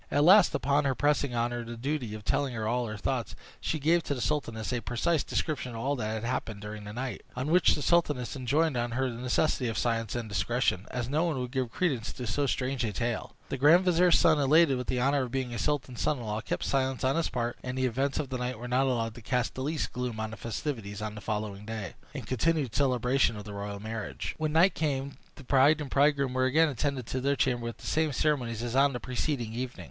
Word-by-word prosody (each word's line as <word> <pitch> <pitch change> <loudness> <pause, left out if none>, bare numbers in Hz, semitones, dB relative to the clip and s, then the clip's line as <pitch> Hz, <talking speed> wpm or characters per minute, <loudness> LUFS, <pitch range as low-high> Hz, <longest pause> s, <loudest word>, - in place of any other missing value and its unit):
At 145 - +2
last, 190 +4 +7
upon 140 +2 +2
her 135 -1 +1
pressing 145 -3 +1
on 120 +1 +1
her 120 0 -3
the 115 0 -7
duty 125 -3 -2
of 105 -1 -10
telling 140 -3 0
her 110 -1 -2
all 120 +1 0
her 105 0 -5
thoughts, 120 +1 -2 0.2
she 160 - -1
gave 165 +4 +3
to 140 - -1
the - - -5
sultaness 115 -5 -2
a 120 - -1
precise 135 +7 0
description 140 -6 -2
of - - -5
all 135 +5 0
that 110 -1 -3
happened 110 -4 -3
to 105 - -5
her - - -6
during 105 -1 -8
the 105 - -7
night; 125 -2 -4
on 130 +5 -2
which 180 0 +5
the 150 - -4
sultaness 150 -8 +1
enjoined 140 +4 +1
on 120 -1 -1
her 130 +1 0
the 115 - -7
necessity 125 0 +1
of 115 - -2
silence 115 -2 0
and 120 -2 -3
discretion, 105 +1 0
as 120 -2 -3
no 155 +6 +1
one 155 -6 -1
would 125 -1 -4
give 130 -3 -1
credence 130 -7 -1
to 125 - -6
so 145 +3 0
strange 130 -1 -1
a 110 - -1
tale. 115 +1 -3
The 135 - -2
grand 165 +7 +6
vizier's 180 0 +5
son, 155 -2 +4
elated 145 +1 +5
with 125 0 -4
the 125 - 0
honor 140 +3 +2
of 125 -2 -4
being 130 -2 -2
the 120 - -4
sultan's 140 -5 -1
son 150 - +1
in 120 - -7
law, 105 0 -3
kept - - -3
silence 130 -1 0
on 130 +1 +2
his 165 -1 0
part, 120 -1 -3
and 125 0 -4
the 130 - +1
events 135 +3 0
of 140 - -2
the 130 -1 -3
night 125 -1 -3
were 120 +2 -7
not 130 +2 +2
allowed 115 -3 0
to 120 - -11
cast 125 +1 -1
the 130 - -6
least 150 +3 -2
gloom 125 -3 -3
on 110 0 -3
the - - -6
festivities 110 -4 -4
on 105 -1 -4
the 105 - -8
following 105 -1 -3
day, 110 -4 -5 0.2
in - - -4
continued 140 0 0
celebration 125 -3 +2
of 105 - -7
the 105 - -8
royal 100 0 -5
marriage. 110 +1 -5
When 155 -1 -1
night 175 +4 +5
came 140 -3 -2 0.2
the 145 - -12
bride 140 +4 +4
and 145 -3 -5
bridegroom 140 -2 +3
were 130 0 +2
again 155 +5 +4
attended 135 -1 -2
to 130 - -2
their 140 +2 +2
chamber 125 -3 0
with 115 - -5
the - - -13
same 155 -1 +1
ceremonies 125 -5 0
as 120 0 -3
on 140 +1 +4
the 125 - -3
preceding 125 -2 -2
evening. 125 +1 -4
125 Hz, 255 wpm, -29 LUFS, 115-145 Hz, 0.2 s, last